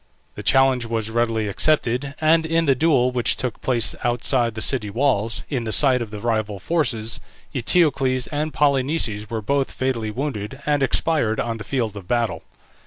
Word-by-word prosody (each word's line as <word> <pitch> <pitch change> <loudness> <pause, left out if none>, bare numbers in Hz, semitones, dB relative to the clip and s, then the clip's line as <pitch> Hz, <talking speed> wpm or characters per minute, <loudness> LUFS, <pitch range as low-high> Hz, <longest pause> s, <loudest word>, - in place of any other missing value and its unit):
The - - -8
challenge 135 -2 +3
was 115 -1 -2
readily 115 -2 0
accepted, 135 +3 0
and 160 +1 +4
in 165 +1 +1
the 140 - +4
duel 130 -3 +2
which 125 -2 +1
took 125 -4 -3
place 120 -3 +1
outside 120 -1 +1
the - - -4
city 115 -5 +1
walls, 115 -2 0
in 130 -5 -2
the 110 - -3
sight 130 0 +4
of 115 - -4
the 105 - -7
rival 110 -2 -1
forces, 120 -6 -1 0.3
Eteocles 135 -2 +2
and 150 +1 -2
Polynices 135 -7 0
were 110 -2 -4
both 140 +4 0
fatally 125 -4 -2
wounded 130 0 -4
and 145 -1 +1
expired 135 -4 +1
on 115 -1 -2
the 105 - -7
field 115 -2 -2
of 95 -3 -9
battle. 120 0 -1
125 Hz, 175 wpm, -22 LUFS, 110-140 Hz, 0.3 s, and